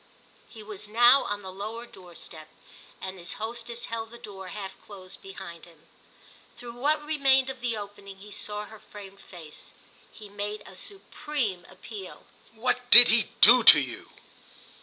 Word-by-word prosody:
He 220 -2 -13
was 210 -1 -9
now 240 +5 +4
on 205 0 -5
the 190 - -8
lower 215 +5 -8
door 180 -6 -16
step, 155 -1 -12 0.5
and 190 0 -8
his 170 - -5
hostess 235 +1 -7
held 225 -1 -6
the 235 - -13
door 200 -5 -11
half 195 0 -8
closed 190 -2 -14
behind 190 -4 -11
him. 165 -3 -22 0.7
Through 240 -2 -10
what 295 +5 -1
remained 270 -3 +2
of 260 -1 -13
the 235 -3 -3
opening 200 -1 -11
he 205 +2 -14
saw 210 0 -5
her 220 +1 -15
framed 200 -2 -14
face. 165 -5 -13 0.4
He 215 - -13
made 205 +1 -7
a - - -14
supreme 260 - -5
appeal. 205 -5 -11 0.3
"What 245 +2 -2
did 245 0 +11
he 225 +1 +2
do - - +8
to - - +10
you?" - - -7
210 Hz, 160 wpm, -26 LUFS, 190-240 Hz, 0.7 s, did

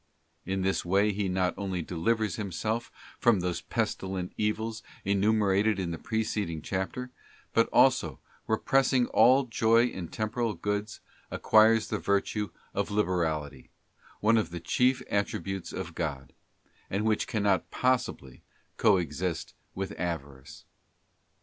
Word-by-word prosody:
In 95 0 -1
this 95 0 0
way 100 +4 +2
he 100 -1 -1
not 90 0 +1
only 95 -3 -2
delivers 105 +3 0
himself 110 +4 -3 0.3
from 120 -5 +4
those 90 -1 -2
pestilent 95 -1 -3
evils 110 +1 -2 0.2
enumerated 100 +1 +2
in 90 -3 -2
the 80 - -5
preceding 105 -8 -2
chapter, 100 +8 -3 0.4
but - - +3
also, - - +3 0.3
repressing 130 +3 +2
all 130 +3 +5
joy 115 -1 +3
in 95 -8 -4
temporal 110 +3 -2
goods, 105 +4 -3 0.3
acquires 110 0 +4
the - - -1
virtue 100 +1 0 0.2
of - - -1
liberality, 80 -9 -1 0.5
one 115 +2 +4
of 110 - -2
the 85 0 -6
chief 125 +9 +1
attributes 95 -2 -2
of 85 - -5
God; 70 -7 -4 0.6
and 100 +3 -1
which 110 -1 +1
cannot 100 -5 +1
possibly 125 - -1 0.4
coexist 90 -4 +1 0.2
with 95 0 -4
avarice. 70 -7 -5
100 Hz, 125 wpm, -29 LUFS, 90-110 Hz, 0.6 s, all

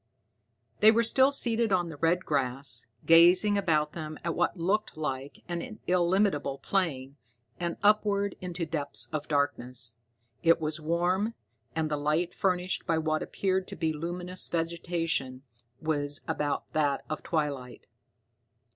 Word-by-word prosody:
They 215 - +8
were 230 +1 +4
still 265 +4 +5
seated 235 -5 +2
on 175 -3 +1
the 160 - -8
red 170 +4 +1
grass, 135 -3 -1 0.2
gazing 175 +5 +6
about 155 -6 +1
them 155 -2 -6
at 170 0 -1
what - - 0
looked 195 +3 -1
like 140 -3 -5
an 175 +5 -5
illimitable 180 -5 +1
plain, 140 -7 -2 0.4
and 170 -1 -2
upward 205 -1 +2
into 180 -2 -3
depths 155 -2 -1
of 150 -1 -3
darkness. 125 -5 0 0.4
It 165 0 +4
was 155 0 -3
warm, 180 +7 0 0.4
and 160 -1 -1
the 150 - 0
light, 155 +4 0
furnished 180 -1 0
by 165 -2 +2
what 155 -1 0
appeared 190 -1 -1
to - - -7
be 160 -2 -1
luminous 175 +3 -3
vegetation, 165 -5 -2 0.4
was 145 -2 +1
about 150 -3 -2
that 145 -3 0
of 155 - -4
twilight. 145 -6 -3
165 Hz, 140 wpm, -29 LUFS, 150-185 Hz, 0.4 s, They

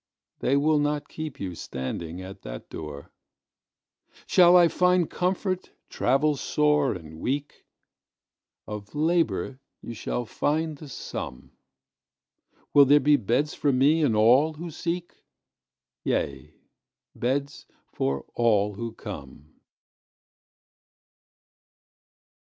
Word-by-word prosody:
They 140 - +2
will 150 +1 +3
not 145 0 -1
keep 155 -3 -6
you 95 -2 -4
standing 80 +5 -5
at 95 +1 -10
that - - -9
door. 75 -2 -8 1.1
Shall 180 0 +6
I 175 -1 +7
find 180 +1 +3
comfort, 185 +1 -1 0.2
travel 140 +3 +2
sore 150 0 +2
and 80 -2 -10
weak? 140 - -4 1.0
Of 105 +3 -8
labour 160 -4 0 0.2
you 120 - -8
shall 120 +2 -3
find 155 +6 -1
the 145 0 -11
sum. 65 - -7 1.2
Will 140 -1 +8
there 145 +2 +6
be 145 +2 +4
beds 135 +5 0
for 145 - +1
me 140 +5 +3
and 130 -8 +2
all 125 +9 +5
who 165 +2 -7
seek? 175 +2 -4 0.8
Yea, 70 -2 -2 0.6
beds 140 +3 -2 0.3
for 70 0 -1
all 105 -3 +2
who 115 +3 -5
come. 75 - -10
140 Hz, 105 wpm, -26 LUFS, 100-155 Hz, 1.2 s, Will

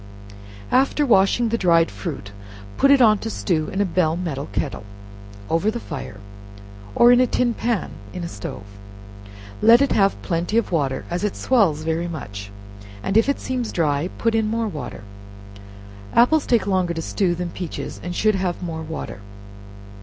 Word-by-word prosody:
After 275 +3 +3
washing 225 0 +3
the 230 +1 -1
dried 170 -2 +3
fruit, 100 0 -6 0.4
put 275 - +3
it 275 -2 +6
on 215 -2 +5
to 225 - -4
stew 165 -7 -1
in 190 - -3
a - - +2
bell 170 -3 +1
metal 150 -6 -4
kettle 100 0 -3 0.6
over 165 - +1
the 235 +2 -3
fire, 135 - -7 0.8
or 240 +1 +7
in 245 - +6
a 255 - +4
tin 240 0 +1
pan 230 -3 -2 0.2
in 180 -2 -6
a - - -3
stove, 100 -6 -7 1.0
let 235 +1 +7
it 280 - +2
have 195 -1 +2
plenty 175 +5 -1
of 230 - 0
water, 140 -6 -1
as 175 +3 -2
it 210 - -1
swells 190 - +2
very 165 +2 -1
much, 100 -11 -7 0.5
and 195 - -2
if 225 +5 +4
it 280 - 0
seems 250 -3 -3
dry, 155 0 0
put 230 -1 +1
in 220 -1 +1
more 225 +1 -1
water. 150 - -7 1.1
Apples 280 +6 +4
take 235 -4 +2
longer 185 -3 0
to 165 - -3
stew 180 -1 0
than 175 0 -4
peaches, 175 -3 -6
and 175 0 -5
should 215 +3 +2
have 185 -2 -2
more 165 -2 -4
water. 160 -9 -6
185 Hz, 175 wpm, -22 LUFS, 160-230 Hz, 1.1 s, or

